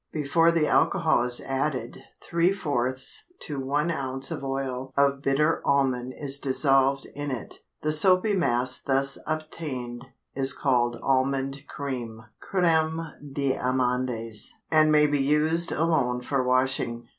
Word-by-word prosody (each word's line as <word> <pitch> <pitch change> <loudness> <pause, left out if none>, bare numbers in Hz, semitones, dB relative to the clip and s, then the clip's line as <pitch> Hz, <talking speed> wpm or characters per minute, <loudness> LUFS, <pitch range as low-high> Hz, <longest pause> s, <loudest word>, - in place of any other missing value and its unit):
Before 165 +3 +2
the 165 -2 +1
alcohol 165 -4 +2
is 120 0 +5
added 135 -3 -3 0.2
three 170 +2 +1
fourths 130 - -1
to 145 -2 -5
one 145 +5 -1
ounce 135 -3 -3
of - - -5
oil 135 -1 -4
of 140 0 +2
bitter 150 +4 +1
almond 130 -3 0
is 140 -1 +1
dissolved 135 0 +2
in 145 0 -5
it. 130 -4 -6 0.2
The 155 - +1
soapy 185 +6 +5
mass 125 -9 +2
thus 135 0 +1
obtained 140 -6 -5 0.3
is 135 0 +2
called 120 -3 0
"almond 135 +1 -1
cream" 125 -6 -6 0.3
(crême 160 -3 +1 0.2
d'amandes) 125 -4 -1 0.2
and 155 -1 +4
may 150 0 +5
be 145 -1 0
used 155 +4 +1
alone 140 -7 0
for 135 0 -1
washing. 125 -2 0
135 Hz, 130 wpm, -25 LUFS, 130-155 Hz, 0.3 s, is